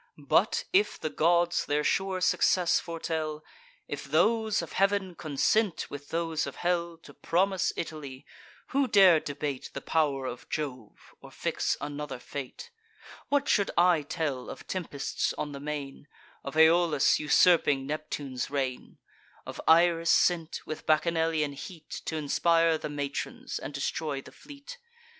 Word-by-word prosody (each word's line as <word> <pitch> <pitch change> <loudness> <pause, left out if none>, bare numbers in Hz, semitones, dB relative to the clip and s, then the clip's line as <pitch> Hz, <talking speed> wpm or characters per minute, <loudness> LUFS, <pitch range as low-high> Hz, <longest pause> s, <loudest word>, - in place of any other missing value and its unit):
But, - - +2
if 400 +2 +2
the 155 - -3
gods 175 +1 +2
their 150 +1 +1
sure 190 +1 0
success 180 -1 +3
foretell; 160 -2 -4 0.4
If - - -5
those 220 -1 +2
of - - -9
heav'n 195 -1 +1
consent 170 +6 0
with 145 0 -8
those 165 -1 -1
of - - -7
hell, 170 -1 -1
To - - -13
promise 190 +2 +1
Italy; 145 -4 -6 0.4
who 275 0 +1
dare 190 -7 +6
debate 145 -2 -5
The - - -2
pow'r 145 -4 0
of 125 -1 -7
Jove, 130 -8 -6
or - - -12
fix - - -2
another 145 -1 -5
fate? 140 - -8 0.6
What 285 -1 +1
should 200 - +2
I 175 -2 +5
tell 145 -3 -3
of - - -9
tempests 165 -7 -3
on 150 - -3
the 140 - -7
main, 145 -1 -6 0.4
Of 140 +3 -6
Aeolus 160 -2 +4
usurping 150 -3 +4
Neptune's 145 -3 -4
reign? 135 -3 -3 0.5
Of - - -7
Iris 165 0 +4
sent, 170 -2 +2
with 155 - -7
Bacchanalian 160 -2 +1
heat 160 +3 -9
T' 160 - -3
inspire 165 +2 +2
the 150 - -5
matrons, 145 -1 -4
and 135 - -6
destroy 145 0 -3
the - - -12
fleet? 290 - -12
160 Hz, 140 wpm, -28 LUFS, 145-175 Hz, 0.6 s, dare